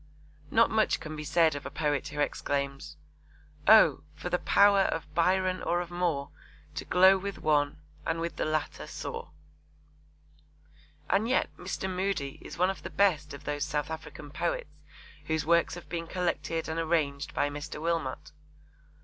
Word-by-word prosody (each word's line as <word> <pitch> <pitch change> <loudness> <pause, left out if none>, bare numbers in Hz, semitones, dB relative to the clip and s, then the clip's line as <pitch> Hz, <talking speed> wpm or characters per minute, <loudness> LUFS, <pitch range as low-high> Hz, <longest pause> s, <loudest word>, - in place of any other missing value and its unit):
Not 230 +1 +4
much 220 -1 +2
can 155 -1 -7
be 155 - -5
said 160 +1 +3
of 145 0 -5
a - - -5
poet 145 -3 -1
who 150 0 -6
exclaims: 140 -1 -2 0.7
Oh, - - +7
for - - -6
the - - +2
power 200 0 +5
of 165 -5 -1
Byron 185 +2 +2
or 175 - +1
of 175 -1 -5
Moore, 170 -6 -1 0.4
To - - -5
glow 190 +2 +6
with 200 +1 -5
one, 145 -1 +1 0.2
and 165 - -1
with 170 0 -3
the - - 0
latter 155 0 -2
soar. - - -6 1.8
And 220 +4 +2
yet 260 - +1
Mr. 190 +1 -4
Moodie 185 -7 -2
is 155 - -9
one 180 +2 +3
of 195 - -9
the - - -6
best 155 -7 +1
of 140 - -12
those 145 0 -2
South 150 0 -2
African 150 -2 -8
poets 165 -1 -2 0.6
whose 160 -1 0
works 170 +1 +3
have 175 - -10
been 165 -1 -4
collected 170 -2 -2
and 160 +1 -2
arranged 155 -4 0
by 145 - +1
Mr. 145 +1 -6
Wilmot. 165 -5 -2
160 Hz, 165 wpm, -29 LUFS, 150-180 Hz, 1.8 s, Oh